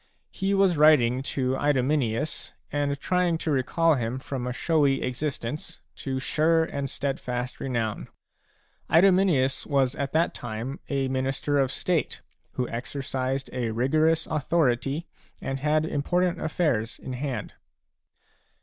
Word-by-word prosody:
He 195 0 0
was 195 -4 +3
writing 130 -5 +5
a - - -3
to 130 -1 -1
Idomeneus 145 -1 0 0.2
and 145 -1 -1
trying 180 -1 +1
to 160 - -2
recall 155 +5 +2
him 120 -2 -1
from 130 -2 -4
a - - -1
showy 145 0 +2
existence 130 +1 -4 0.2
to 135 -1 -3
sure 160 +4 +2
and 140 -3 -3
steadfast 125 -2 -3
renown. 115 -5 -2 0.8
Idomeneus 170 -7 +4
was 135 -3 +2
at 140 -1 -3
that 165 +2 +2
time 120 +4 -5
a 135 -1 0
minister 135 +2 0
of 135 -1 +2
state 175 +1 -1 0.3
who 125 - -1
exercised 130 +2 -3
a 125 -2 -1
rigorous 155 +8 +2
authority 150 -1 0 0.3
and 135 0 -3
had 155 +2 +2
important 175 +4 0
affairs 145 -9 0
in 130 - -7
hand. 130 0 -4
140 Hz, 130 wpm, -26 LUFS, 130-155 Hz, 0.8 s, writing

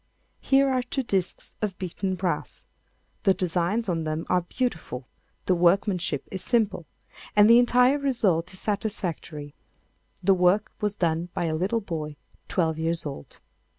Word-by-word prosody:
Here 275 0 +3
are 260 -1 +1
two 255 +2 -3
disks 190 -6 -1
of 200 -4 -2
beaten 185 +1 -3
brass: 180 -1 -3 0.6
the 195 -2 +3
designs 180 +5 0
on 165 -3 -1
them 155 +1 -3
are 180 0 +3
beautiful, 160 - -3 0.4
the 185 - +3
workmanship 180 -3 +1
is 190 -1 -4
simple, 215 - +1 0.5
and 210 0 +7
the 230 +1 +8
entire 250 +3 +4
result 200 - +1
is 185 - -8
satisfactory. 175 -8 -3 0.7
The 195 +2 +5
work 185 +3 +3
was 210 -1 0
done 170 -1 0
by - - 0
a 160 -1 0
little 195 +8 0
boy 155 -6 -5 0.3
twelve 160 -3 0
years 165 0 -1
old. 140 - -8
185 Hz, 150 wpm, -26 LUFS, 165-215 Hz, 0.7 s, the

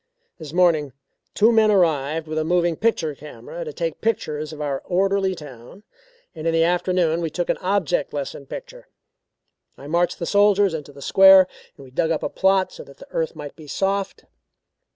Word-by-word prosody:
This 155 -3 -8
morning 160 -6 +2 0.4
two 220 +3 +5
men 220 -2 +4
arrived 160 -5 +1
with 155 0 -3
a - - 0
moving 175 0 +1
picture 165 -7 0
camera 445 - -9
to 470 - -6
take - - -4
pictures 155 -9 -2
of 155 - -10
our 140 -2 -3
orderly 190 +1 0
town, 145 - -12 0.5
and 160 -2 -5
in 165 - +1
the 165 - +4
afternoon 175 -1 +1
we 165 - -2
took 175 +3 -1
an - - -3
object 185 -6 0
lesson 140 -1 -6
picture. - - -9 0.9
I 140 - -12
marched 170 +4 0
the 170 - -4
soldiers 205 -1 +3
into 150 -3 -6
the 140 0 -12
square 190 0 +8 0.4
and - - -12
we 130 - -15
dug 160 +5 0
up 160 -2 -1
a - - -1
plot 190 0 +2
so - - -10
that 140 - -16
the - - -15
earth 165 0 -2
might 150 -2 -8
be 155 -2 -13
soft. 195 +5 -2
170 Hz, 190 wpm, -22 LUFS, 150-195 Hz, 0.9 s, square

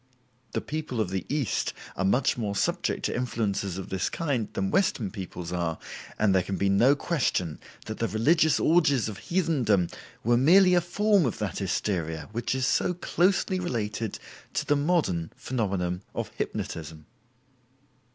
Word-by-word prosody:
The - - -1
people 150 -5 -4
of 100 -4 0
the 95 -2 -3
East 140 -6 0 0.2
are 95 - -1
much 120 +8 +2
more 105 -4 -2
subject - - 0
to - - -1
influences 105 -6 -1
of 95 - -6
this 95 -1 -1
kind 135 -10 -1
than 95 0 -1
Western 120 - +1
peoples 90 -4 -6
are, 85 -2 -1 0.4
and 105 -2 +3
there 95 - +4
can 95 +2 -3
be 100 - +1
no 120 +9 +5
question 125 - -1 0.3
that - - -6
the - - +1
religious 155 - +3
orgies 155 -8 +3
of 105 -3 -6
heathendom 130 - +1 0.3
were 120 +1 +3
merely 180 +8 +6
a 175 - +5
form 200 -1 +2
of 115 - -3
that 105 -3 -3
hysteria 85 -4 -2
which 120 +3 -1
is 130 0 0
so 180 - +1
closely 185 +2 +1
related 110 - -2 0.4
to - - 0
the 145 - +3
modern 145 - +1
phenomenon 95 -7 -2
of - - -3
hypnotism. 80 -1 -5
110 Hz, 160 wpm, -27 LUFS, 95-155 Hz, 0.4 s, merely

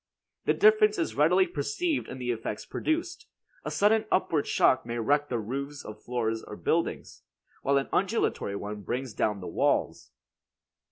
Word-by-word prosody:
The - - +3
difference 425 0 +5
is 335 - -1
readily 180 +6 +4
perceived 300 - -2
in 130 - -7
the 125 -1 -2
effects 110 -2 -4
produced. 340 +3 -2 0.4
A - - -3
sudden 215 +2 +3
upward 160 -5 +1
shock 130 - +3
may 120 +1 -4
wreck 145 +5 +1
the 120 - -1
roofs 140 +6 -5
or 105 - -6
floors 115 0 -3
of - - -11
buildings, - - -1 0.4
while 140 0 +2
an 135 - 0
undulatory 190 - 0
one 105 +1 -5
brings 125 +3 -4
down 105 -2 -1
the 90 - -6
walls. - - 0
140 Hz, 160 wpm, -28 LUFS, -, 0.4 s, difference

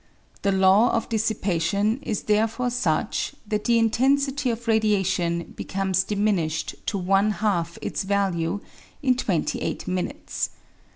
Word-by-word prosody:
The 200 - +2
law 190 +5 +5
of 230 - -1
dissipation 210 -1 0
is 215 -6 -3
therefore 225 +3 +1
such 245 - -1
that 210 0 -2
the 235 -1 +4
intensity 270 +4 +2
of 235 0 -4
radiation 190 -6 +1
becomes 190 -1 0
diminished 195 -6 0
to 200 - 0
one 195 +3 +2
half 175 -5 -1
its - - -2
value 195 -2 0 0.4
in 255 -2 +4
twenty 190 -10 -1
eight - - -3
minutes. 185 -1 -2
205 Hz, 125 wpm, -24 LUFS, 190-225 Hz, 0.4 s, law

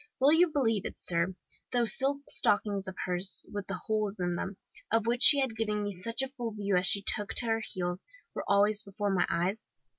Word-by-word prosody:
Will 275 +3 +5
you 345 +2 +5
believe 225 - +1
it, - - -11
sir, 170 +2 -1 0.4
those 240 -2 +1
silk 280 +1 0
stockings 205 -1 +1
of 190 - -6
hers 180 +1 -3
with 205 -2 -4
the 195 - -4
holes 215 -2 -1
in 175 -1 -1
them, 190 +2 -4 0.3
of 225 0 +2
which 240 +1 0
she 285 - +8
had 260 -5 0
given 210 -1 -1
me 205 - -2
such 230 +8 -2
a - - -2
full 245 -4 -6
view 200 -2 -1
as 180 0 +3
she 200 - +3
took 210 -1 0
to 240 - +3
her 225 -1 0
heels, 180 -2 -3 0.3
were - - -4
always 205 +1 +3
before 200 0 -3
my 180 - +2
eyes? 185 +6 -1
210 Hz, 215 wpm, -30 LUFS, 190-230 Hz, 0.4 s, she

